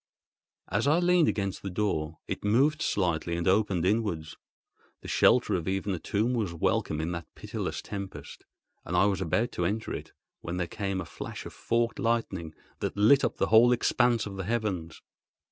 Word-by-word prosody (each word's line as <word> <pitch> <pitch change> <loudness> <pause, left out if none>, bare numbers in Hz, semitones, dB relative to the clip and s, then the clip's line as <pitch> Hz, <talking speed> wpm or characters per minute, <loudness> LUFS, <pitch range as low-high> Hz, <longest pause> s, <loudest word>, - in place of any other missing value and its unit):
As 105 +8 0
I 150 +3 +4
leaned 175 -2 +4
against 100 -2 -1
the 100 - -4
door, 85 -5 -1
it - - -4
moved 135 +9 +3
slightly 85 - 0
and 85 - -2
opened 95 -3 +2
inwards. 95 -6 0 0.7
The - - -10
shelter - - +4
of 85 -2 -1
even 95 +1 -1
a 90 - -3
tomb 110 +8 0
was 105 -8 -1
welcome 80 -1 0
in 80 +2 -2
that 85 -1 -5
pitiless - - -4
tempest, 100 -2 -7 0.4
and 90 - -2
I 95 - +5
was 100 -2 +1
about 110 +7 0
to 90 - -2
enter 105 +5 -2
it - - -7 0.3
when 85 +2 -5
there 90 - 0
came 95 +1 -3
a - - -6
flash - - -7
of - - -8
forked 115 0 -1
lightning 95 -9 -1 0.2
that - - -3
lit 120 +7 +5
up - - 0
the - - 0
whole 120 +2 +8
expanse 120 -1 +2
of 100 -2 -7
the 95 - -3
heavens. 100 -8 -2
100 Hz, 185 wpm, -28 LUFS, 85-115 Hz, 0.7 s, whole